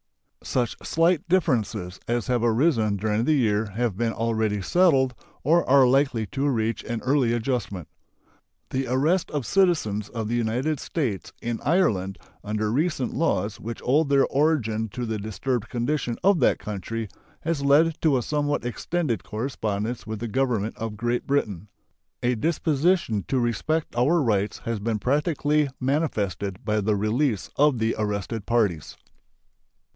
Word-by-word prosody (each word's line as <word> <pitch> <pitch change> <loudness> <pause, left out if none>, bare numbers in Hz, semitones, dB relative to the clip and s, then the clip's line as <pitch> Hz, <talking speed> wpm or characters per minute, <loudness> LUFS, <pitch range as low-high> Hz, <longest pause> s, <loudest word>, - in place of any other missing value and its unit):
Such 120 -7 -1
slight 165 0 +1
differences 115 - 0
as 120 -2 0
have 120 0 0
arisen 115 -3 +2
during 110 +3 0
the 155 - +3
year 110 -5 +1
have 120 -4 0
been 115 +3 0
already 110 -2 0
settled 135 - +3 0.3
or 165 +5 +4
are 135 -1 +7
likely 130 -3 +2
to 140 +4 -1
reach 115 -3 -1
an 120 -1 -3
early 130 -2 +2
adjustment. 110 - -2 0.8
The 130 0 -1
arrest 150 +9 +1
of 145 -5 -3
citizens 150 - +1
of 115 -3 -4
the 115 - -2
United 125 +6 0
States 125 - -3
in 120 -1 -3
Ireland 105 - +1 0.3
under 105 0 -1
recent 140 -1 0
laws 105 - 0
which 115 +1 -7
owe 145 +5 +4
their 140 -2 +3
origin 125 -7 +1
to 120 +4 -4
the 110 -2 -3
disturbed 110 +3 -3
condition 120 0 -1
of 195 -3 +4
that 125 - +3
country 110 +2 -5 0.3
has 165 -3 -1
led 150 +3 +3
to 150 -5 +3
a 125 - -1
somewhat 145 -1 -1
extended 130 +2 -2
correspondence 110 -1 -3
with 110 0 -4
the 120 - -3
Government 115 -3 0
of 110 -1 -5
Great 120 +2 -1
Britain. 105 -9 -1 0.6
A 120 +1 +2
disposition 155 - +1
to 135 - 0
respect 150 +7 -1
our 140 +8 +3
rights 105 -7 0
has 115 -2 -2
been 110 +1 -1
practically 145 - +1
manifested 105 - -1
by 105 -1 +1
the 105 +1 +1
release 110 +2 0
of 145 -2 +3
the 115 0 +1
arrested 105 +1 -3
parties. 100 -10 0
120 Hz, 150 wpm, -25 LUFS, 110-145 Hz, 0.8 s, are